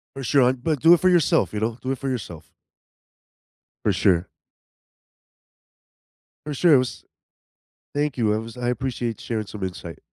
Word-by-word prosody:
For 135 - -6
sure, 135 +3 +3
hon, 125 +1 +2
but 155 -3 -1
do 165 +2 +7
it 175 - 0
for 185 - +4
yourself, 175 -4 +3
you 105 - -3
know, 115 +2 -2
do 130 +1 -1
it 130 - -5
for 135 - -4
yourself. 90 -11 -6 1.3
For - - +2
sure. 90 -2 +2 2.2
For 150 - -4
sure, 165 +2 +5
it 135 - +7
was 125 -1 -3 0.9
Thank 145 -2 -1
you, 110 -3 +2
it 110 - -1
was 115 +2 -10
I 120 0 -2
appreciate 120 -2 -3
sharing 110 -3 -3
some 100 0 -9
insight. 90 -2 -7
125 Hz, 170 wpm, -23 LUFS, 110-140 Hz, 2.2 s, do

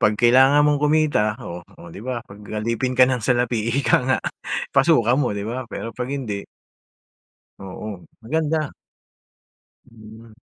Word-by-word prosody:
pag 105 - +4
kailangan 130 +5 +5
mong 150 0 +3
kumita 145 -7 +1
oh, 85 -5 -8 0.2
oh 85 - -11
di 100 +7 -10
ba, 125 -2 -3
pag 100 -2 -14 0.2
alipin 115 +4 -1
ka 130 0 +5
ng 125 -4 -1
salapi 120 -2 +1
ika - - +3
nga 130 - +2 0.5
pasukan 135 -4 +4
mo, 125 -6 0
di - - -3
ba? 125 +3 -4
Pero - - -6
pag 125 0 -3
hindi 110 -8 -4 1.1
Oo, 95 +3 -7 0.3
maganda. 155 +3 -1 1.2
Hmm. 110 -1 -14
120 Hz, 145 wpm, -22 LUFS, 110-135 Hz, 1.2 s, kailangan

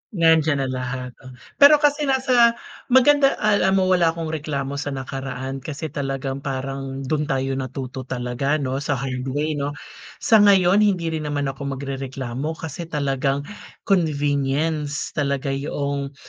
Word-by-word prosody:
Nandiyan 160 -4 +3
na 130 - -2
lahat 125 0 -4
o 130 -1 -12 0.2
pero 285 +1 +9
kasi 290 0 +2
nasa 255 -3 +4 0.3
maganda 275 +2 +5
alam 200 -2 +3
mo, 185 -1 +2
wala 175 -2 +4
akong 165 -2 -4
reklamo 140 -3 -3
sa 145 - -4
nakaraan 135 0 -5
kasi 150 +2 -6
talagang 135 -1 -3
parang 135 0 -4
dun 150 +2 -1
tayo 135 0 -1
natuto 130 0 -6
talaga, 125 +3 -1
'no, 135 -3 -2
sa 145 0 -1
hard 130 0 -4
way, 145 +4 -1
'no? 145 +1 -3 0.5
Sa 220 - +6
ngayon, 195 -2 +5
hindi 185 -6 +2
rin 155 -2 -3
naman 145 -2 -1
ako 140 0 -5
magrereklamo 135 +1 -4
kasi 160 +1 -7
talagang 140 -2 -1 0.4
convenience 145 -3 0
talaga 140 -1 -1
'yong 140 0 -3
140 Hz, 145 wpm, -22 LUFS, 135-165 Hz, 0.5 s, pero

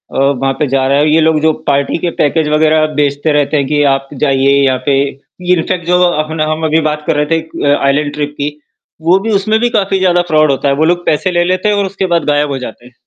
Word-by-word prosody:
अ, - - -2
वहाँ 135 0 +1
पे 150 - +1
जा 135 0 0
रहा 140 - +2
है 150 +1 +2
ये 160 - +4
लोग 160 -1 +2
जो 160 0 +3 0.2
पार्टी 140 +2 0
के 175 - -1
पैकेज 150 +1 +1
वग़ैरह 155 0 +2
बेचते 145 +2 0
रहते 145 +1 0
हैं 140 - 0
कि 145 -1 0
आप 135 0 -4
जाइए 135 -1 +2
यहाँ 130 -1 +1
पे 140 - +2 0.6
इनफ़ैक्ट 170 0 -2
जो 180 - +3
अपना 155 -2 0
हम 160 +1 -3
अभी 160 +1 +2
बात 150 0 -2
कर 160 - +1
रहे 150 - +1
थे, 165 +2 0
एक 160 0 -7 0.3
आइसलैंड 145 +1 0
ट्रिप 145 -1 -4
की, 145 +1 -2 0.5
वो 175 +4 +3
भी 225 - -1
उसमें 215 +2 0
भी 240 0 +1
काफ़ी 195 -3 0
ज़्यादा 175 -1 +2
फ्रॉड 155 -2 +3
होता 135 +1 -1
है। - - +2
वो 155 +3 +1
लोग 175 +1 0
पैसे 170 +5 0
ले 175 0 +1
लेते 185 +3 0
हैं 210 - +1
और 200 -1 0
उसके 195 0 -3
बाद 165 - 0
गायब 145 0 +1
हो 135 - -2
जाते 125 -1 -9
हैं। 125 - -16
155 Hz, 255 wpm, -13 LUFS, 145-175 Hz, 0.6 s, ये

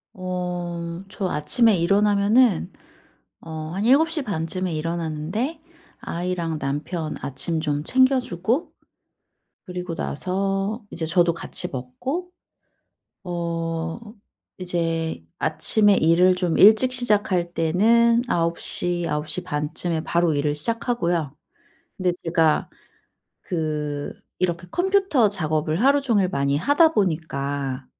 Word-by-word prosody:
어. 180 -1 -4
저 195 -1 -3
아침에 210 - +3
일어나면은 205 +4 +3 0.7
어 160 -1 -7
한 200 +3 -2
7:30 270 - +2
쯤에 185 -1 -3
일어나는데 165 - -3 0.4
아이랑 170 -2 -3
남편 150 +4 -3
아침 160 +4 -3
좀 145 -2 -1
챙겨주고 255 - +1 1.0
그리고 180 -1 -5
나서 195 - -2
이제 165 - -4
저도 175 0 +3
같이 180 +1 -3
먹고 260 - -5 0.9
어 165 0 -3 0.6
이제 165 - -2 0.2
아침에 205 -2 +3
일을 180 +2 +4
좀 180 -3 0
일찍 220 +5 +6
시작할 205 -8 +1
때는 230 +9 +3
9:00, 170 0 -1
9:30 150 0 -2
쯤에 165 -1 -2
바로 170 -2 +1
일을 145 +1 0
시작하고요. 170 - -1 0.6
근데 185 -2 +1
제가 165 -2 +2 0.7
그 150 -3 -3 0.3
이렇게 180 -1 -1
컴퓨터 365 - +2
작업을 155 -2 -1
하루 280 +3 +5
종일 210 -9 +2
많이 140 -4 0
하다 305 - +4
보니까 140 -7 -2
175 Hz, 205 characters per minute, -23 LUFS, 160-210 Hz, 1.0 s, 일찍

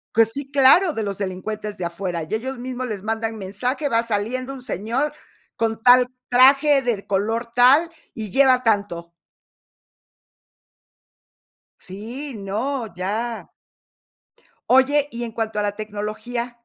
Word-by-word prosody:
Pues 225 0 +4
sí, 275 +1 -5
claro, 290 +6 +5
de 220 - -3
los 200 -2 -4
delincuentes 205 +2 -5
de 175 - -4
afuera. 170 -1 -4
Y 155 - -8
ellos 255 +4 -3
mismos 255 0 -5
les 205 -3 -5
mandan 225 0 -2
mensaje: 245 +9 -3
"Va 230 0 +2
saliendo 235 +5 -2
un 260 - -10
señor 250 - -2 0.4
con 225 -1 -2
tal 250 +1 +6 0.2
traje, 275 +3 +5
de 235 -6 -2
color 225 +4 -1
tal 270 +7 +5 0.2
y 220 -6 -6
lleva 260 -1 +4
tanto". 200 -7 -1 2.7
Sí, 235 +9 -7
no, 225 +6 -3
ya. 220 +6 -3 1.2
Oye, 280 +3 +4
y 235 +1 -5
en 230 - -5
cuanto 220 -1 -3
a - - +1
la 205 0 -2
tecnología. 215 +3 -5
230 Hz, 135 wpm, -22 LUFS, 205-255 Hz, 2.7 s, tal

